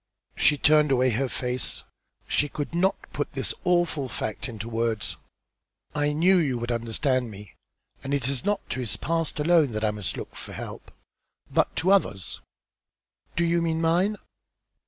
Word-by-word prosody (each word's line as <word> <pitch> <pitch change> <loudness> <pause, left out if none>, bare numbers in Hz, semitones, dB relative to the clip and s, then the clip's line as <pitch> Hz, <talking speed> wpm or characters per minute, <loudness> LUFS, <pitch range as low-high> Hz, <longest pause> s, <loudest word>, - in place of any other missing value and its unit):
She 150 - +4
turned 150 +1 +5
away 130 -1 +3
her 130 +4 0
face. 125 0 -2 0.4
She 145 - +1
could 145 +2 -4
not 185 +3 +3 0.2
put - - -3
the - - -1
awful 175 -6 +2
fact 110 +2 -4
into 110 -1 -6
words. 115 -2 -1 0.8
"I 145 0 +1
knew 175 +6 +4
you 140 -8 +1
would 120 +1 -3
understand 120 +2 0
me, 100 -2 -11 0.5
and 135 - -4
it 140 -3 +1
is 135 -2 -1
not 205 0 -1
to - - -2
his 120 -4 -2
past 165 -2 -1
alone 155 -4 +4
that 110 +1 0
I 105 - +2
must 105 -3 -4
look - - -7
for - - -7
help, - - -8 0.6
but - - +2
to 185 +4 +2
others." 100 - +1 0.9
"Do 170 - +2
you 170 0 +2
mean 165 -1 0
mine?" 175 +6 +2
140 Hz, 165 wpm, -26 LUFS, 120-165 Hz, 0.9 s, turned